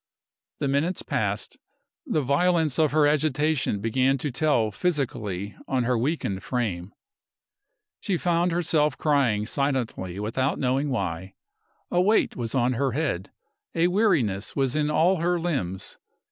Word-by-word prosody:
The -, -, -1 dB
minutes 145 Hz, +7 st, 0 dB
passed. -, -, -2 dB, 0.5 s
The 155 Hz, -, 0 dB
violence 160 Hz, +1 st, +2 dB
of 155 Hz, -2 st, +3 dB
her 150 Hz, 0 st, +4 dB
agitation 150 Hz, -4 st, +1 dB
began 130 Hz, +5 st, +2 dB
to 140 Hz, +2 st, -3 dB
tell 125 Hz, -5 st, +1 dB
physically 105 Hz, -, -2 dB
on 130 Hz, -2 st, 0 dB
her 125 Hz, +1 st, +1 dB
weakened 115 Hz, -, -1 dB
frame. 105 Hz, -7 st, -3 dB, 1.1 s
She 195 Hz, -4 st, -1 dB
found 175 Hz, +1 st, +1 dB
herself 155 Hz, -4 st, +1 dB
crying 130 Hz, -9 st, +2 dB
silently 120 Hz, -9 st, -2 dB
without 130 Hz, +6 st, -1 dB
knowing 135 Hz, +3 st, 0 dB
why. 95 Hz, -6 st, -3 dB, 0.6 s
A 175 Hz, -, +3 dB
weight 210 Hz, +4 st, +2 dB
was 120 Hz, 0 st, -3 dB
on 125 Hz, 0 st, +2 dB
her 130 Hz, 0 st, 0 dB
head, 130 Hz, -, -2 dB, 0.5 s
a 170 Hz, +1 st, +3 dB
weariness 160 Hz, -, +1 dB
was 135 Hz, -2 st, 0 dB
in 150 Hz, -1 st, +1 dB
all 175 Hz, +5 st, +3 dB
her 175 Hz, +1 st, +1 dB
limbs. 135 Hz, -, -3 dB
140 Hz, 135 wpm, -25 LUFS, 115-160 Hz, 1.1 s, her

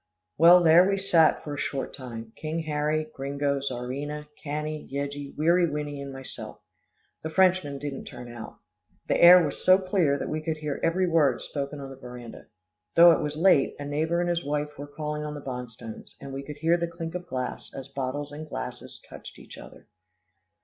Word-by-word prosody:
Well, 175 Hz, +3 st, +7 dB
there 170 Hz, +3 st, +7 dB
we 195 Hz, -, +1 dB
sat 170 Hz, -5 st, +3 dB
for 145 Hz, -, -5 dB
a 145 Hz, -, -5 dB
short 135 Hz, -1 st, -3 dB
time 115 Hz, -3 st, -8 dB
King 160 Hz, +1 st, -3 dB
Harry, 155 Hz, 0 st, -1 dB
Gringo, 140 Hz, +1 st, -1 dB
Czarina, 140 Hz, +3 st, -4 dB, 0.2 s
Cannie, 150 Hz, +1 st, -4 dB
Yeggie, 140 Hz, 0 st, -5 dB
Weary 170 Hz, +3 st, +3 dB
Winnie 145 Hz, -1 st, -4 dB
and 140 Hz, 0 st, -6 dB
myself. 135 Hz, -1 st, -8 dB, 0.6 s
The 160 Hz, -, -4 dB
Frenchmen 180 Hz, -4 st, +2 dB
didn't 140 Hz, -1 st, -6 dB
turn 125 Hz, -, -9 dB
out. 120 Hz, -2 st, -9 dB, 0.5 s
The -, -, +1 dB
air 175 Hz, 0 st, +9 dB
was 145 Hz, -, -5 dB
so 185 Hz, 0 st, +7 dB
clear 185 Hz, -7 st, +1 dB
that -, -, -4 dB
we 155 Hz, 0 st, -3 dB
could 155 Hz, 0 st, -2 dB
hear 150 Hz, -2 st, -4 dB
every 180 Hz, +3 st, +1 dB
word 150 Hz, -7 st, +3 dB
spoken 140 Hz, +1 st, -5 dB
on 135 Hz, -1 st, -7 dB
the 135 Hz, -, -10 dB
veranda. 125 Hz, -2 st, -10 dB, 0.5 s
Though 170 Hz, +1 st, +9 dB
it -, -, +2 dB
was 150 Hz, 0 st, -3 dB
late, 165 Hz, -5 st, +4 dB
a 145 Hz, -, -6 dB
neighbour 160 Hz, +4 st, 0 dB
and 175 Hz, -, 0 dB
his 170 Hz, 0 st, -1 dB
wife 150 Hz, +1 st, -2 dB
were 145 Hz, +1 st, -8 dB
calling 150 Hz, +1 st, -4 dB
on 150 Hz, 0 st, -5 dB
the -, -, -6 dB
Bonstones, 125 Hz, -4 st, -8 dB
and 140 Hz, -1 st, -8 dB
we 135 Hz, -, -4 dB
could 150 Hz, +1 st, -9 dB
hear 165 Hz, +3 st, +2 dB
the 170 Hz, 0 st, -1 dB
clink 165 Hz, -1 st, -6 dB
of 180 Hz, 0 st, -6 dB
glass, 130 Hz, -1 st, -5 dB
as 135 Hz, -1 st, -8 dB
bottles 140 Hz, +1 st, -4 dB
and 155 Hz, +1 st, -8 dB
glasses -, -, -7 dB
touched -, -, -11 dB
each -, -, -12 dB
other. -, -, -13 dB
150 Hz, 195 wpm, -27 LUFS, 140-165 Hz, 0.6 s, air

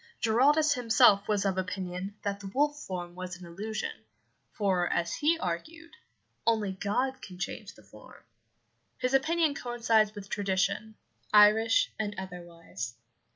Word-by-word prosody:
Giraldus 285 Hz, +7 st, +4 dB
himself 225 Hz, -5 st, +4 dB
was 205 Hz, -2 st, +1 dB
of 190 Hz, -1 st, 0 dB
opinion 185 Hz, +1 st, -4 dB
that 200 Hz, -1 st, -2 dB
the 200 Hz, -, -8 dB
wolf 290 Hz, +8 st, +1 dB
form 175 Hz, -2 st, -5 dB
was 185 Hz, 0 st, -7 dB
an 180 Hz, -, -11 dB
illusion, 215 Hz, -, -4 dB, 0.6 s
for, 190 Hz, -4 st, 0 dB
as 170 Hz, 0 st, 0 dB
he 320 Hz, +3 st, +2 dB
argued, 325 Hz, -, -5 dB, 0.6 s
only 220 Hz, -4 st, +2 dB
God 245 Hz, +8 st, -2 dB
can 180 Hz, -2 st, -10 dB
change 200 Hz, +2 st, -6 dB
the 110 Hz, -, -18 dB
form. 105 Hz, +1 st, -16 dB, 0.7 s
His 255 Hz, +1 st, -1 dB
opinion 310 Hz, +3 st, +2 dB
coincides 230 Hz, -4 st, +1 dB
with 200 Hz, -1 st, -8 dB
tradition, 200 Hz, +2 st, -1 dB, 0.4 s
Irish 215 Hz, +2 st, +5 dB
and 210 Hz, -1 st, -2 dB
otherwise. 170 Hz, -, -7 dB
205 Hz, 135 wpm, -29 LUFS, 185-240 Hz, 0.7 s, Irish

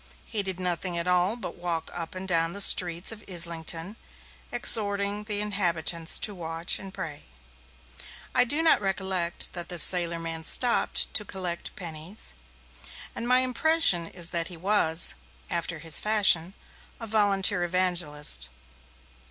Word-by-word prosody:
He 215 Hz, -, -1 dB
did 190 Hz, -2 st, -6 dB
nothing 180 Hz, -1 st, -2 dB
at 170 Hz, +1 st, -2 dB
all 180 Hz, +4 st, +1 dB
but 225 Hz, -7 st, -8 dB
walk 170 Hz, -2 st, -4 dB
up 170 Hz, 0 st, -7 dB
and 185 Hz, +1 st, -7 dB
down 165 Hz, -2 st, 0 dB
the 200 Hz, -, -6 dB
streets 175 Hz, -1 st, +4 dB
of 215 Hz, -1 st, -8 dB
Islington 170 Hz, +2 st, -1 dB, 0.5 s
exhorting 205 Hz, -1 st, +4 dB
the 210 Hz, -1 st, 0 dB
inhabitants 170 Hz, -5 st, -1 dB
to 210 Hz, -, +2 dB
watch 165 Hz, -1 st, -3 dB
and 195 Hz, 0 st, -10 dB
pray. 155 Hz, -5 st, -8 dB, 1.1 s
I -, -, +4 dB
do 290 Hz, +6 st, 0 dB
not 320 Hz, -9 st, +3 dB
recollect 190 Hz, -3 st, -1 dB
that 175 Hz, -1 st, -6 dB
this 175 Hz, -2 st, +4 dB
sailor 170 Hz, -2 st, +3 dB
man 165 Hz, -1 st, -6 dB
stopped 245 Hz, +8 st, +2 dB
to 210 Hz, -, +3 dB
collect 185 Hz, -3 st, -7 dB
pennies, 165 Hz, -, -7 dB, 0.8 s
and 235 Hz, -, -6 dB
my 250 Hz, +1 st, +4 dB
impression 255 Hz, -, +1 dB
is 175 Hz, -1 st, -4 dB
that 170 Hz, -1 st, -2 dB
he 175 Hz, -, -9 dB
was, 175 Hz, -3 st, +3 dB, 0.4 s
after 170 Hz, -1 st, -3 dB
his 160 Hz, 0 st, 0 dB
fashion, 195 Hz, -4 st, +3 dB, 0.4 s
a 230 Hz, -, -6 dB
volunteer 200 Hz, -4 st, +2 dB
evangelist. 170 Hz, -, -1 dB
180 Hz, 145 wpm, -25 LUFS, 170-205 Hz, 1.1 s, streets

